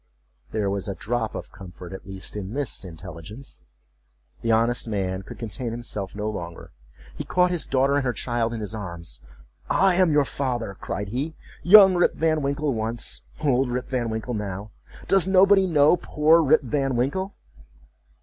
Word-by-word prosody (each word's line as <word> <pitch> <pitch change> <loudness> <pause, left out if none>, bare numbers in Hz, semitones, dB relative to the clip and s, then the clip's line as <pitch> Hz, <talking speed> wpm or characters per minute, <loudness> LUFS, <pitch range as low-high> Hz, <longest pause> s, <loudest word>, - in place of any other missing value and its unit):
There 105 -2 -1
was 100 0 -2
a 100 - -3
drop 110 +4 -2
of - - -7
comfort, 90 -1 -10
at 95 - -9
least, 95 0 -5
in 105 +2 -5
this 140 -7 -2
intelligence. 85 - -9 0.8
The 115 - 0
honest 115 +2 +2
man 95 -3 -2
could - - -11
contain 115 +2 -5
himself 110 -4 -5
no 105 +1 -3
longer. 85 -5 -6 0.4
He - - -4
caught 180 0 +2
his 175 -3 -3
daughter 135 +2 +2
and 145 - +1
her 125 - +1
child 120 0 -1
in 115 -2 -4
his 105 0 -5
arms. 85 - -6 0.5
"I 195 -1 +4
am 180 -2 +3
your 145 -1 +4
father!" 125 -7 -2
cried 100 +1 -5
he—"Young 170 - +5
Rip 175 -1 +2
Van 155 -1 +1
Winkle 140 +1 -1
once—old 125 +4 -2
Rip 125 +1 -3
Van 125 -3 -1
Winkle 110 +2 -3
now!—Does 105 - -2
nobody 195 0 +5
know 150 -1 +5
poor 155 +1 +3
Rip 155 0 +4
Van 135 0 -1
Winkle?" 190 +11 -1
120 Hz, 160 wpm, -24 LUFS, 105-150 Hz, 0.8 s, he—"Young